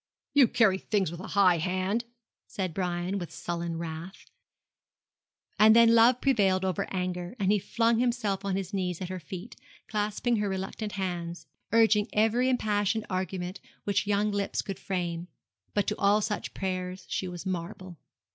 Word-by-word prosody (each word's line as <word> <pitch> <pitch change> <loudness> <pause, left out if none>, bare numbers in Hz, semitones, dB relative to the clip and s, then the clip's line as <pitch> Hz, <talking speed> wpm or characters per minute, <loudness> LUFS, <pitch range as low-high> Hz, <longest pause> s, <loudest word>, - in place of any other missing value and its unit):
'You 280 -4 +7
carry 195 -6 +3
things 195 -6 0
with 170 - -7
a 185 - -7
high 180 -4 +5
hand,' 185 +6 -1 0.4
said 185 -4 -3
Brian, 180 +2 -2
with 175 - -6
sullen 170 -1 -4
wrath; 165 +3 -7 1.3
and 220 +1 +8
then 230 0 +7
love 235 +2 +5
prevailed 195 -8 +3
over 185 -3 -2
anger, 180 +1 -3
and 200 -2 +2
he 210 - +3
flung 230 +3 +1
himself 235 -5 0
on 195 -1 -1
his 190 -1 -4
knees 180 -3 -1
at 185 - -5
her 185 0 -4
feet, 180 +6 -8 0.3
clasping 215 +3 0
her 205 -1 0
reluctant 195 +2 -4
hands, 175 -3 -4 0.3
urging 220 -2 +4
every 225 +4 +3
impassioned 215 -3 +1
argument 185 0 -3 0.2
which 205 0 0
young 205 +1 +2
lips 200 -1 -1
could 195 -2 -6
frame; 175 -2 -3 0.5
but 205 - +2
to - - -1
all 205 +1 +4
such 210 0 -3
prayers 185 -1 -3
she 185 - -2
was 175 +1 -7
marble. 180 -1 -5
195 Hz, 160 wpm, -28 LUFS, 180-215 Hz, 1.3 s, and